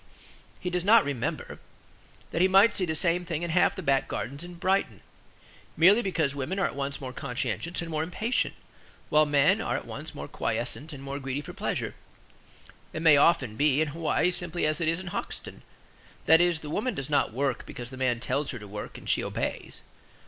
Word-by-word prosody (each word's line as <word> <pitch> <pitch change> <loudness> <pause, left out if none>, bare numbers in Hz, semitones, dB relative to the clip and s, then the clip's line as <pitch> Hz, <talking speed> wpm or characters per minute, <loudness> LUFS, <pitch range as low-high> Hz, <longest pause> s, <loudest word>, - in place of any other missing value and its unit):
He 180 - -3
does 180 -1 -1
not 220 +1 +6
remember 140 -5 -3 0.7
that 165 - 0
he 185 - +6
might 195 +4 +6
see 185 - +1
the 160 -2 -2
same 170 +2 +2
thing 170 -2 -3
in 170 - -2
half 175 +2 +3
the - - -6
back 135 -2 +2
gardens 140 +7 -4
in 175 0 -9
Brixton, 190 +3 0 0.8
merely 195 +8 +6
because 165 -9 0
women 140 +7 -3
are 195 - +2
at - - -2
once 140 0 -3
more 130 -2 -6
conscientious 145 +7 -2
and 165 - -7
more 155 -1 0
impatient, 185 +9 -1 0.5
while 150 0 +4
men 145 -1 +4
are - - -1
at - - -7
once - - -8
more - - -6
quiescent 120 +7 -3
and 140 -2 -9
more 140 +1 -4
greedy 135 +1 -3
for - - -9
pleasure. - - -3 1.0
It 160 - -4
may 160 -3 +8
often 140 -6 +3
be 145 +2 +3
in 155 -1 +1
Hawaii 165 +3 +1
simply 175 -1 -2
as 155 +2 0
it 165 - +1
is 165 +2 +1
in 190 - -8
Hoxton. - - -6 0.6
That 160 +2 +7
is, 175 -2 +2
the 150 - -7
woman 220 +6 -1
does 135 0 -5
not 145 - +2
work 135 +2 -2
because 120 +1 -8
the - - -8
man 130 -2 0
tells 140 +4 -1
her 125 - -3
to 105 -2 -10
work 105 +1 -7
and - - -12
she - - +2
obeys. - - -4
155 Hz, 205 wpm, -28 LUFS, 140-175 Hz, 1.0 s, may